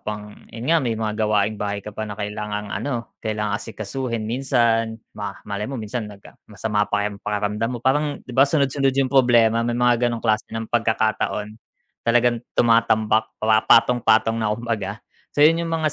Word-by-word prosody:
pang 105 -1 -5 0.2
yun 115 +1 -8
nga 165 - +4
may 120 -5 -1
mga 110 -1 -2
gawaing 105 -1 0
bahay 100 -1 -3
ka 105 - -7
pa 110 +1 -5
na 105 - -6
kailangang, 105 0 -4
ano, 115 +3 -4
kailangan 105 -2 -2
asikasuhin 115 +2 -4
minsan. 115 -2 +1 0.2
Ma 100 -1 -6
malay 105 +2 -4
mo 135 - -4
minsan 110 0 -4
nag 100 -1 -14
ah, - - -16
masama 105 -1 -1
pa 105 0 0
yung 100 -1 -4
pakiramdam 105 +2 -1
mo 125 - -4
parang, 145 +2 +1
'di 125 - -10
ba, 135 +3 +4
sunod-sunod 140 -2 +1
yung 135 -1 +1
problema, 120 -3 +4
may 120 0 -1
mga 120 0 +3
ganong 120 0 -5
klase 110 -1 +1
ng 115 0 -4
pagkakataon, 110 -1 0 0.4
talagang 120 0 +2 0.2
tumatambak, 110 -2 +3
pa 110 0 +3
patong-patong 115 -1 +4
na 110 - 0
kumbaga. 110 -3 -4 0.3
So 145 - +6
yun 165 +2 +5
yung 170 - -3
mga 160 -2 0
115 Hz, 180 wpm, -22 LUFS, 105-120 Hz, 0.4 s, So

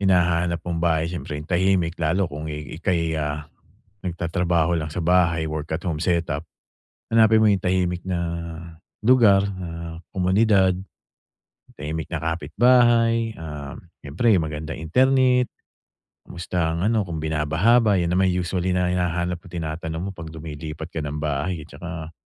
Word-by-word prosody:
hinahanap 85 -3 +2
mong 85 -1 -2
bahay, 85 0 +1
siyempre 80 -4 -5
yung 75 +1 -8
tahimik. 90 -2 +2
Lalo 85 +5 +2
kung, 75 -1 -6
eh, 75 -1 -6
ika'y, 85 -3 0
ah, 75 0 -3 0.6
nagtatrabaho 85 -1 0
lang 80 - -4
sa 80 +2 -4
bahay, 85 -2 +3
work 75 -1 -4
at - - -10
home 80 -4 -2
setup. 85 -4 0 0.7
Hanapin 110 -1 +5
mo 110 - +5
yung 100 -2 +2
tahimik 90 -1 0
na 95 -1 -2 0.8
lugar, 105 -4 +5
ah, 85 -2 -7
komunidad, 95 0 +3 1.0
tahimik 80 +1 -4
na 80 - -3
kapitbahay, 115 - +3
ah, 75 -3 -7 0.2
siyempre 80 +12 0
yung 80 - -1
magandang 75 +1 -5
internet. 125 +8 +3 0.7
Kamusta 90 -1 -3
ang 85 - -1
ano, 110 +1 +2
kung 85 -4 -5
binabaha 80 +9 +2
ba, 110 -3 +2
yan 85 -1 0
naman 95 +1 +3
usually 90 0 0
na 90 0 +1
hinahanap 90 -1 -1
mo, - - -18
tinatanong 80 -1 -4
mo 100 - -3
pag 85 -4 -9
lumilipat 80 0 -7
ka 80 - -3
ng 75 0 -4
bahay, 75 +2 -2
eh, - - -15
tsaka 80 +1 -8
85 Hz, 150 wpm, -23 LUFS, 80-95 Hz, 1.0 s, Hanapin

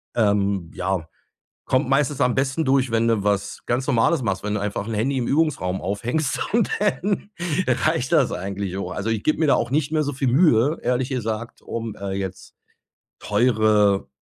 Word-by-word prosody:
ähm, 100 -5 +1
ja, 95 -4 -2 0.6
kommt 130 +1 +1
meistens 140 0 +1
am 125 -1 +3
besten 135 +4 0
durch, 135 -3 +2
wenn 115 0 +2
du 110 -3 +1
was 100 -1 0
ganz 130 +3 -1
Normales 130 +4 +2
machst, 100 -4 -1
wenn 105 - -2
du 105 - -1
einfach 105 +1 -3
'n 115 - -3
Handy 130 +6 0
im 120 - -1
Übungsraum 140 - 0
aufhängst 120 - -1
und 230 -2 +2
dann 205 0 -1 0.4
reicht 155 -2 +1
das 150 -6 +4
eigentlich 95 0 -4
auch. 100 - -4
Also 110 +3 -3
ich 110 -2 -1
gebe 155 - +1
mir 160 - +2
da - - +5
auch 120 - -1
nicht 150 +2 0
mehr 155 -1 +1
so 145 0 -3
viel 135 -1 0
Mühe, 145 0 +3
ehrlich 125 +1 0
gesagt, 115 -2 -4
um, 115 -2 -5
äh, 100 -1 -5
jetzt 95 -1 -6 0.6
teure, 105 - +2
120 Hz, 185 wpm, -23 LUFS, 100-140 Hz, 0.6 s, da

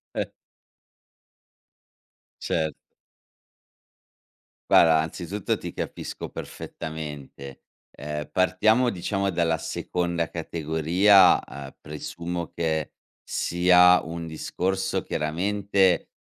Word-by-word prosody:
Eh. - - -1 2.1
Cer 80 -2 -1 2.0
Guarda, 80 -1 +6
anzitutto 85 +5 -3
ti - - -7
capisco - - -6
perfettamente. 75 -4 -8 0.3
Ehm, 75 +1 -6
partiamo, 110 +7 +3
diciamo, 100 +1 -1
dalla 85 -2 +1
seconda 85 +1 -2
categoria, 85 +5 +4
uhm, 70 -1 -9
presumo 85 +3 -6
che 80 -2 -1 0.3
sia 90 +1 +4
un 85 0 -6
discorso, 95 +4 -2
chiaramente, 95 +3 +1
85 Hz, 75 wpm, -25 LUFS, 80-95 Hz, 2.1 s, Guarda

